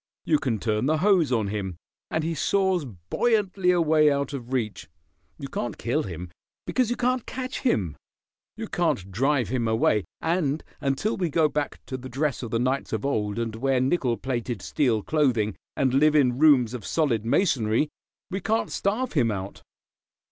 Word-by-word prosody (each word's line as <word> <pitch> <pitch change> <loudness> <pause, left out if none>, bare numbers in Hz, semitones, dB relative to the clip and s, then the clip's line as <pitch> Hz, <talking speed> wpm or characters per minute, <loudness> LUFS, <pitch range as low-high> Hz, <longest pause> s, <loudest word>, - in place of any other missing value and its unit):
You 155 -2 +3
can 120 -5 -1
turn 110 +3 0
the 155 +1 +2
hose 180 -4 +3
on 110 -5 +1
him, 100 -3 -3 0.3
and 160 - -1
he 165 +1 -1
soars 185 +2 +1
buoyantly 185 - 0
away 160 -4 +4
out 140 0 -1
of 125 -2 -6
reach. 110 -9 -2 0.5
You - - -6
can't - - -4
kill - - 0
him, 90 -1 -7 0.3
because 255 -3 +1
you 240 - 0
can't 250 0 0
catch 255 0 -4
him. 95 - 0 0.6
You - - -5
can't 95 0 -1
drive 130 +1 +1
him 120 -2 0
away, 110 -3 +2
and 160 -3 0 0.2
until 140 +10 -1
we 180 -3 0
go 155 +1 +3
back 150 0 -3
to 130 - -5
the 130 0 -9
dress 140 +2 -1
of 120 - -5
the 115 - 0
knights 130 +3 -1
of - - -2
old 105 -6 -1
and 115 -1 -2
wear 135 +2 +1
nickel 130 -3 +1
plated 120 -5 -3
steel 115 -6 +1
clothing, 120 -9 +1 0.2
and 130 -3 +2
live 150 +3 +4
in 130 -4 +3
rooms 135 -7 +5
of 120 -4 -5
solid 130 - 0
masonry, 120 - +2 0.4
we 190 +1 -2
can't 220 +4 0
starve 220 +6 -1
him 125 -8 +3
out. 95 -2 -5
135 Hz, 175 wpm, -25 LUFS, 115-160 Hz, 0.6 s, rooms